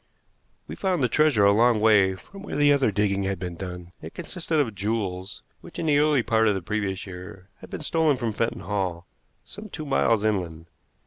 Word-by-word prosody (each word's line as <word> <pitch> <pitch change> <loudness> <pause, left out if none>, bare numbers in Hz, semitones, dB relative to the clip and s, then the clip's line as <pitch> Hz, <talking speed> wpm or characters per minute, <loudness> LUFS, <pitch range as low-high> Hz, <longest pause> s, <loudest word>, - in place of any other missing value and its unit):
We - - -7
found 185 -7 0
the - - +4
treasure 145 -8 +3
a 100 - +6
long 115 +2 +4
way 105 -3 +4
from 195 - -13
where 200 - -6
the 145 0 +5
other 135 -6 +2
digging 100 -1 0
had 95 0 -1
been 90 -1 -5
done. 90 -1 -8
It 80 - -10
consisted 165 -4 -2
of 120 -7 0
jewels 95 -2 -3 0.2
which, - - -13
in - - -3
the 145 -2 +3
early 150 -4 +3
part 110 -1 +2
of 105 - +2
the 95 - -3
previous 100 -1 -3
year, 95 +1 -10
had - - -13
been - - -6
stolen 155 -2 +1
from 120 -3 -2
Fenton 115 +2 -2
Hall, 95 -4 -3 0.4
some 210 +1 -10
two 155 -4 -6
miles 115 -6 +2
inland. 85 -6 -2
105 Hz, 205 wpm, -25 LUFS, 95-145 Hz, 0.4 s, a